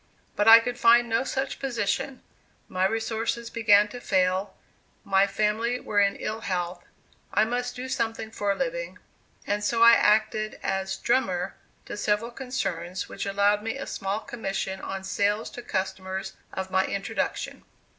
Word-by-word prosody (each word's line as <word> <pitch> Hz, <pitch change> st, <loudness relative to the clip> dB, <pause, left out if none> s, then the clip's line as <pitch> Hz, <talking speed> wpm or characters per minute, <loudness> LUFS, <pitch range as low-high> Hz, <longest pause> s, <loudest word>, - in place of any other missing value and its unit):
But 205 Hz, -, +1 dB
I 225 Hz, +1 st, +11 dB
could 245 Hz, +1 st, -4 dB
find 235 Hz, +1 st, +6 dB
no 230 Hz, +1 st, +1 dB
such 270 Hz, 0 st, -3 dB
position; 255 Hz, 0 st, -2 dB, 0.4 s
my 185 Hz, +1 st, +1 dB
resources 225 Hz, +1 st, -2 dB
began 210 Hz, -2 st, +5 dB
to 245 Hz, +3 st, -8 dB
fail; 185 Hz, 0 st, +1 dB, 0.5 s
my 195 Hz, 0 st, +3 dB
family 215 Hz, +4 st, 0 dB
were 205 Hz, -, 0 dB
in 200 Hz, 0 st, +3 dB
ill 215 Hz, +1 st, -4 dB
health; 175 Hz, -2 st, -3 dB, 0.5 s
I 215 Hz, -, +3 dB
must 245 Hz, +2 st, -2 dB
do 255 Hz, +1 st, -5 dB
something 225 Hz, -3 st, -2 dB
for 205 Hz, -2 st, -2 dB
a -, -, -7 dB
living; -, -, -3 dB, 0.5 s
and 205 Hz, 0 st, -1 dB
so 230 Hz, +2 st, +2 dB
I 235 Hz, -, +10 dB
acted 215 Hz, 0 st, +2 dB
as 190 Hz, 0 st, -1 dB
"drummer" 190 Hz, -7 st, 0 dB, 0.3 s
to -, -, -6 dB
several 210 Hz, +3 st, 0 dB
concerns 185 Hz, -9 st, -3 dB
which -, -, -5 dB
allowed 200 Hz, +1 st, +2 dB
me 225 Hz, +4 st, -3 dB
a 275 Hz, -, -5 dB
small 195 Hz, +2 st, -3 dB
commission 195 Hz, -4 st, -4 dB
on 195 Hz, 0 st, -5 dB
sales 205 Hz, +2 st, 0 dB
to 245 Hz, -, -8 dB
customers 190 Hz, -3 st, -3 dB, 0.2 s
of 190 Hz, 0 st, -5 dB
my 190 Hz, 0 st, +2 dB
introduction. 200 Hz, +3 st, -3 dB
210 Hz, 155 wpm, -26 LUFS, 195-235 Hz, 0.5 s, I